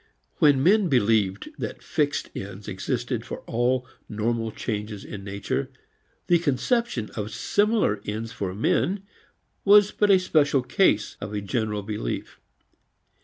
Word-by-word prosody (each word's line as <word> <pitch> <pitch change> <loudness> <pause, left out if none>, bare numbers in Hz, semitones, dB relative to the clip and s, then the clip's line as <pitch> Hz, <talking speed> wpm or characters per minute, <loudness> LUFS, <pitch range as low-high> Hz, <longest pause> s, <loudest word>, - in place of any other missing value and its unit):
When 140 -3 +4
men 195 +1 +4
believed 105 -6 +2
that - - -5
fixed 145 -1 -1
ends 100 +1 -7
existed 120 +4 -2
for - - -7
all 125 +2 0 0.2
normal 115 +1 -1
changes 105 -2 -4
in 100 -2 -7
nature, 105 +7 -3 0.6
the 175 -1 +4
conception 165 - 0
of 105 -1 -4
similar 205 - +1
ends 110 +2 -4
for 95 -5 -4
men 190 - +1 0.6
was 205 0 +6
but 210 - +1
a 195 - +7
special 150 -7 +2
case 125 - +2
of 100 +1 -5
a 105 - -2
general 105 0 -2
belief. 105 - -4
115 Hz, 130 wpm, -25 LUFS, 105-150 Hz, 0.6 s, a